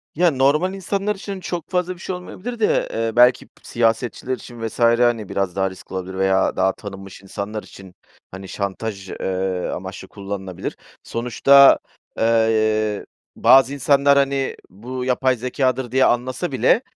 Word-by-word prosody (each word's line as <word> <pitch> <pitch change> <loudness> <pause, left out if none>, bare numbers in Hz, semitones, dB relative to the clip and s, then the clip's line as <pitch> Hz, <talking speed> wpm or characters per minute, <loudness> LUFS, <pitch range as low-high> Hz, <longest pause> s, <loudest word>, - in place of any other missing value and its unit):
Ya, 175 +2 +3
normal 145 +7 +2
insanlar 200 +2 -2
için 195 0 -7
çok 175 -2 -5
fazla 180 0 -1
bir - - -18
şey 185 - -4
olmayabilir 215 +6 -7
de, 215 - +2
eee, 115 0 -1
belki 125 +1 +5
p - - -42
siyasetçiler 120 +2 -1
için 120 -3 -7
vs. 110 - -10
hani, 115 -2 +3
biraz 95 -2 -2
daha 95 0 +1
riskli 95 - -13
olabilir 95 0 -5
veya 95 0 +2
daha 95 0 +2
tanınmış 95 -2 -10
insanlar 100 +2 -6
için, 95 -2 -14 0.4
hani, 95 +1 -9
şantaj, 100 0 -5
eee, 95 -1 -2
amaçlı - - -7
kullanılabilir. 95 -2 -6 0.3
Sonuçta, 135 +4 +5 0.4
eee, 110 -2 +1 0.3
bazı 135 +1 +5
insanlar, 140 +1 +3
hani, 140 -1 0
bu 125 +7 -6
yapay 130 0 +2
zekâdır 125 0 -1
diye 130 +1 +4
anlasa 130 +7 0
bile, 130 - +3
120 Hz, 150 wpm, -21 LUFS, 100-140 Hz, 0.4 s, belki